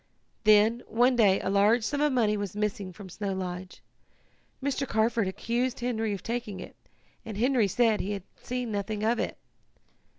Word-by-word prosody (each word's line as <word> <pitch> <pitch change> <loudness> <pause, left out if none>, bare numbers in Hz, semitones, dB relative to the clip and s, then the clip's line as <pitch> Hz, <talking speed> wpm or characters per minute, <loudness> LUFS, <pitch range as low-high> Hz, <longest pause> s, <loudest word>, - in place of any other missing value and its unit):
"Then, 215 +3 +5
one 245 +3 +3
day, 200 -5 +4
a 190 - -1
large 210 +4 +4
sum 285 +6 -1
of 300 0 +3
money 225 -5 +2
was 205 -2 -4
missing 205 -2 -2
from 195 +2 -11
Snow 195 +2 -4
Lodge. 185 -1 -6 0.8
Mr. 275 0 -1
Carford 225 -2 +1
accused 235 +6 -1
Henry 225 -3 -1
of 200 - -4
taking 230 -5 -4
it, - - -9 0.5
and 220 -3 -7
Henry 245 -2 +3
said 225 +2 +2
he 205 - -3
had 200 -3 -5 0.2
seen 250 -2 -3
nothing 205 +1 -3
of 230 +2 +2
it. - - -2
215 Hz, 170 wpm, -28 LUFS, 200-240 Hz, 0.8 s, Then